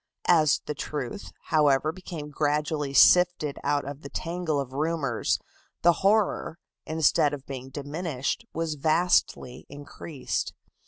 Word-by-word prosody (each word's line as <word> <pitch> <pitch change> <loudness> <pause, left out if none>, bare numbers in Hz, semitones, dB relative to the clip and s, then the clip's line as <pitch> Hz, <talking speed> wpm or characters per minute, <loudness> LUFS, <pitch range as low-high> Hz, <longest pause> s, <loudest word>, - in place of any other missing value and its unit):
As 155 -4 +4
the - - -3
truth, 145 +5 -5 0.2
however, 150 -1 +3
became 160 -4 -8
gradually 150 0 -1
sifted 175 -1 +5
out 145 0 0
of 140 +1 -7
the 140 - -9
tangle 165 -3 -2
of 135 -2 -5
rumors, 145 -5 0 0.5
the 175 +1 +6
horror, 200 -4 +2 0.3
instead 150 -2 +2
of 140 -1 -13
being 130 -1 -7
diminished, 145 - -3
was 165 -1 -2
vastly 155 -4 +1
increased. 145 0 -5
150 Hz, 120 wpm, -26 LUFS, 140-165 Hz, 0.5 s, the